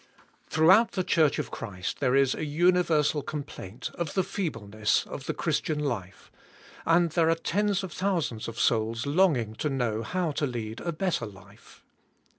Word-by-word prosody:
'HROUGHOUT 190 +9 +5
the 185 - 0
church 155 -4 +3
of - - -3
Christ 95 -5 -5
there 125 - +2
is 135 -1 +4
a - - -4
universal 155 -1 +2
complaint 140 -8 -6
of 170 -4 -4
the 190 - +3
feebleness 110 - -1
of - - -8
the - - 0
Christian 155 - -1
life, 100 -10 -4 0.6
and 165 0 +4
there 165 0 +3
are 165 - +4
tens 200 +4 0
of 180 -4 -6
thousands 170 - -1
of 115 0 -6
souls 115 +1 +1
longing 140 - +2
to 150 - -1
know 120 -5 -1
how 170 +7 -1
to 145 0 -1
lead 115 -3 -5
a 170 - -2
better 165 -8 -1
life. 100 0 -16
150 Hz, 165 wpm, -27 LUFS, 115-170 Hz, 0.6 s, HROUGHOUT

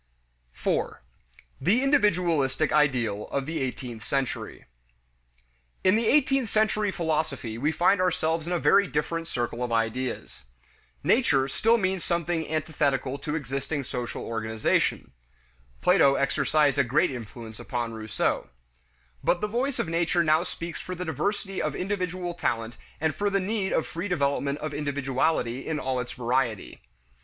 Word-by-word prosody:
4. - - -2 0.6
The 230 +8 +3
"Individualistic" 170 - +2
Ideal 125 -9 +2
of 140 -1 -2
the 160 +2 -3
Eighteenth 125 -3 -4
Century. 135 -2 -3 1.2
In 185 +1 +5
the 225 0 +1
eighteenth 270 -4 +3
century 215 -1 +2
philosophy 155 -10 -2
we 150 +5 +2
find 180 +4 +3
ourselves 165 -2 0
in 180 - -1
a - - +2
very 200 +3 +4
different 165 +2 -2
circle 120 -2 -2
of 120 - -3
ideas. 115 - -2 0.6
"Nature" 145 - +3
still 225 - +3
means 190 -3 0
something 170 -2 -1
antithetical 145 -4 0
to 150 0 -3
existing 140 0 -3
social 125 -2 -4
organization; 110 -1 0 0.7
Plato 170 -7 +5
exercised 145 +1 +2
a - - +6
great 130 +3 +2
influence 115 -2 -8
upon 120 -3 -3
Rousseau. 110 -1 -1 0.7
But 175 - +2
the - - 0
voice 250 +5 -1
of - - -1
nature 170 +1 +2
now 155 0 +4
speaks 170 -1 -6
for 185 - -5
the 180 +1 -4
diversity 195 +4 -2
of - - -1
individual 180 -2 -2
talent 115 -8 -2 0.2
and 160 0 +1
for 205 +5 0
the 195 0 +1
need 195 0 -1
of - - +1
free 170 +5 -4
development 140 -4 0
of 155 -1 -3
individuality 135 -3 -1
in 155 -2 -1
all 130 -2 -1
its 125 -1 -4
variety. 120 -3 -1
155 Hz, 145 wpm, -27 LUFS, 130-180 Hz, 1.2 s, a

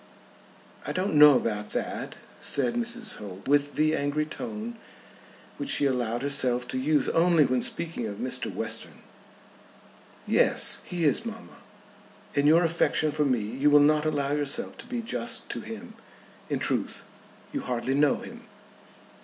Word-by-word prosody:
"I - - -2
don't 185 +1 -1
know 150 -1 +8
about 105 -3 -3
that," - - -3 0.2
said 130 -4 +1
Mrs. 235 -1 -4
Holt, 100 0 -9
with 145 +1 +2
the 155 +1 +2
angry 145 +2 -1
tone 225 +6 -6 0.8
which 285 - -5
she 210 - +2
allowed 120 -2 -1
herself 125 -3 0
to 130 - -2
use 145 +1 +1
only 165 -2 +4
when 125 -1 +1
speaking 165 -8 -2
of 100 - -5
Mr. 125 +1 -2
Western. - - -4 1.2
"Yes; - - +3
he 175 -2 -2
is, 150 - +2
mamma. 230 0 -9 0.8
In 145 0 +2
your 165 +3 +6
affection 165 -2 +1
for 150 0 0
me 125 -5 +1
you 130 +8 +1
will 145 0 +7
not 150 +1 +4
allow 145 -2 -1
yourself 145 +10 0
to - - -10
be 240 -2 -4
just 230 0 -2
to - - -4
him. 225 +1 -9 0.6
In - - 0
truth - - -2 0.5
you 285 - -2
hardly 125 - -2
know 145 0 +3
him." - - -9
150 Hz, 155 wpm, -27 LUFS, 130-180 Hz, 1.2 s, know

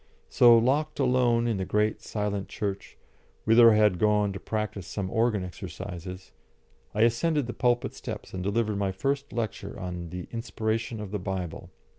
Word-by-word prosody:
So 120 -1 +7
locked 145 +7 +1
alone 125 -3 +3
in 115 -3 0
the 95 - -1
great, 105 +3 0
silent 105 -2 -3
church, 100 -2 -4 0.5
whither 115 +1 +7
I - - +3
had 105 -5 +3
gone 105 -1 +2
to 95 - -6
practise 105 -4 -4
some 95 -2 -4
organ 110 -3 +1
exercises, 90 +1 -8 0.6
I 105 - +4
ascended 145 +5 +2
the 120 - -5
pulpit 120 +1 +1
steps - - -7
and 95 - -4
delivered 105 +1 0
my 100 -1 0
first 140 +9 -2
lecture 110 -4 -4
on 90 -2 -5
the 90 +1 -6
Inspiration 115 0 -2
of 100 -2 -7
the 105 - -2
Bible. 90 -3 -5
105 Hz, 165 wpm, -27 LUFS, 95-115 Hz, 0.6 s, So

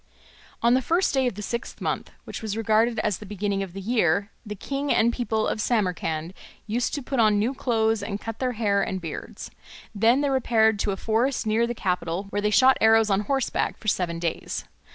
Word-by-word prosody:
On 235 +1 +5
the 260 - +3
first 340 +8 +1
day 265 -2 +2
of 245 - -2
the 210 - -6
sixth 235 +4 -5
month, - - -3
which - - -7
was 220 -1 -3
regarded 225 +1 +2
as 210 -4 -1
the 210 - -9
beginning 200 0 -2
of 190 -3 -5
the 195 - -6
year, 200 -2 +1
the 210 -2 -6
king 275 +7 -3
and 235 +1 +3
people 220 -3 -1
of 215 - -1
Samarcand 180 -7 -1 0.3
used 230 +5 -1
to 285 - -4
put 270 0 -2
on 215 -2 +4
new 225 +6 +1
clothes 225 -4 0
and 200 0 -4
cut 225 0 -7
their 255 -1 -1
hair 205 -3 +1
and 190 -1 -2
beards. 165 -3 -7 0.4
Then 230 +6 +3
they 285 -1 +1
repaired 220 -5 +2
to 200 - 0
a 195 - -3
forest 230 +5 0
near 220 +2 +2
the 240 - -3
capital 180 -2 -2
where 205 - -1
they 210 - +1
shot 260 +5 +5
arrows 220 -1 +5
on 195 - +3
horseback 265 +5 -1
for 215 - -12
seven 175 -3 -1
days. 165 -1 -3
220 Hz, 215 wpm, -25 LUFS, 200-240 Hz, 0.4 s, On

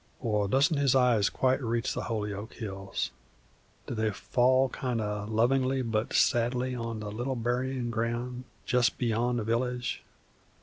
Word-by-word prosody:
Or 105 -3 0
doesn't 140 - +3
his 140 -2 +3
eyes 120 -6 +4
quite 130 +1 +1
reach 115 0 -1
the - - -3
Holyoke 105 -1 -3
hills? 95 -3 -4 0.7
Do - - -5
they 110 -1 0
fall 130 +5 +2
kind 125 -3 -2
o' 105 -1 -3
lovingly 130 +4 +2
but 110 -1 -1
sadly 125 +2 +2
on 115 -3 -4
the 105 -1 -5
little 120 +5 -2
buryin' 125 +1 -1
ground 120 +2 -2 0.2
jest 125 +1 +2
beyond 120 +1 0
the 115 - -1
village? 120 +2 -1
120 Hz, 145 wpm, -29 LUFS, 110-125 Hz, 0.7 s, eyes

